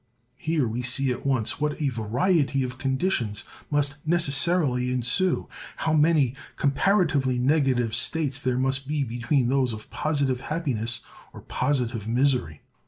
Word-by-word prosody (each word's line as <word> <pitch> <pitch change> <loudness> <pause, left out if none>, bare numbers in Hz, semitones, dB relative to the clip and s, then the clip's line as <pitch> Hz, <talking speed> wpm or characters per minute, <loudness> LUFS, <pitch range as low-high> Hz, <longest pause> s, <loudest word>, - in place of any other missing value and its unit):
Here 155 -4 0
we 115 +3 -3
see 125 +2 +1
at 125 - -4
once 130 0 0
what 150 0 -1
a 145 -3 +1
variety 135 - 0
of 130 0 -6
conditions 130 - -1 0.3
must 145 0 0
necessarily 150 -4 +3
ensue—how 155 +5 -1
many 150 -5 +3 0.2
comparatively 140 -4 +1
negative 130 -4 +1
states 145 +3 0
there 130 -2 -1
must 135 +1 -1
be 150 -1 0
between 120 +2 0
those 130 -3 +1
of 110 0 -9
positive 140 -4 -1
happiness 135 -7 -1 0.3
or - - -10
positive 125 -5 -1
misery! 120 - 0
135 Hz, 130 wpm, -25 LUFS, 125-150 Hz, 0.3 s, necessarily